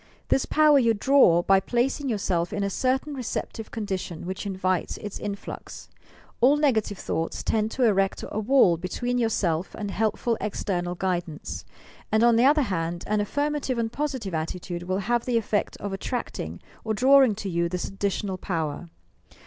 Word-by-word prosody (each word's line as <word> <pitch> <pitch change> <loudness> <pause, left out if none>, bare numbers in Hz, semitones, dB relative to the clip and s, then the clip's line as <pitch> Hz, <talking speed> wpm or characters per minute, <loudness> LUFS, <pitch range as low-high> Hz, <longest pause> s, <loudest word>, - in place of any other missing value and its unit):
This 270 - +2
power 305 -2 +5
you 230 -3 +3
draw 205 -8 +5
by 195 +1 +5
placing 255 +6 -1
yourself 180 -6 0
in 205 - -2
a 200 - -1
certain 265 +6 0
receptive 235 -3 -4
condi 205 -4 -3
tion 175 -2 -7
which 190 +3 -4
invites 185 -2 -1
its 210 -1 -7
influx. 200 -1 -7 0.5
All 270 +5 +5
negative 225 -9 +1
llioughts 165 -1 -3
tend 215 0 +1
to 255 - -1
erect 195 -4 +2
a 215 - -3
wall 220 -6 +4
between 245 +8 -2
yourself 190 -7 0
and 205 -2 -4
helpful 225 +2 0
external 180 -4 -2
guidance, 175 -4 -3 0.5
and, 220 +1 +3
on 235 -1 +6
the 235 +2 +4
other 295 +2 +5
hand, 170 -5 -2
an 210 0 +1
affirmative 285 +3 -1
and 225 -1 -1
positive 260 - -3
attitude 175 +2 -4
will 185 +2 -2
have 240 +1 +1
the 245 -2 +1
effect 210 -2 -1
of 200 -1 -5
attracting 195 - -4 0.2
or 220 -1 -1
drawing 260 -1 +5
to 200 - -5
you 170 -2 0
this 180 0 -3
additional 195 -1 -2
power. 165 -2 -3
205 Hz, 165 wpm, -26 LUFS, 185-245 Hz, 0.5 s, on